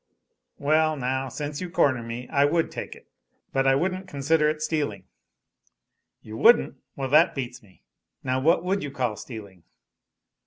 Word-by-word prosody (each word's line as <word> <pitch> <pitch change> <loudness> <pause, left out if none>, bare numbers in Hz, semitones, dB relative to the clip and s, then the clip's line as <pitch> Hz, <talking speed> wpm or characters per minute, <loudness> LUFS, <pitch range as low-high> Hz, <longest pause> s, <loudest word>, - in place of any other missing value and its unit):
"Well, 155 +1 +2
now, 130 0 -2
since 145 +3 -5
you 180 - -4
corner 130 -7 +2
me, 115 +2 -6
I 140 - +3
would 165 +3 +1
take - - -6
it, - - -18 0.5
but 135 0 +2
I 135 - +5
wouldn't 185 +5 -1
consider 150 -1 +1
it 155 0 -2
stealing. 145 - -2 1.2
"You 110 +1 -8
wouldn't! 235 - +5 0.2
Well, 135 -1 -3
that 165 +5 +5
beats 125 -3 -5
me. 100 -5 -23 0.4
Now 130 0 0
what 165 +5 +3
would 195 +2 0
you 145 - -4
call 125 -5 -2
stealing?" 100 -5 -10
140 Hz, 160 wpm, -25 LUFS, 125-160 Hz, 1.2 s, I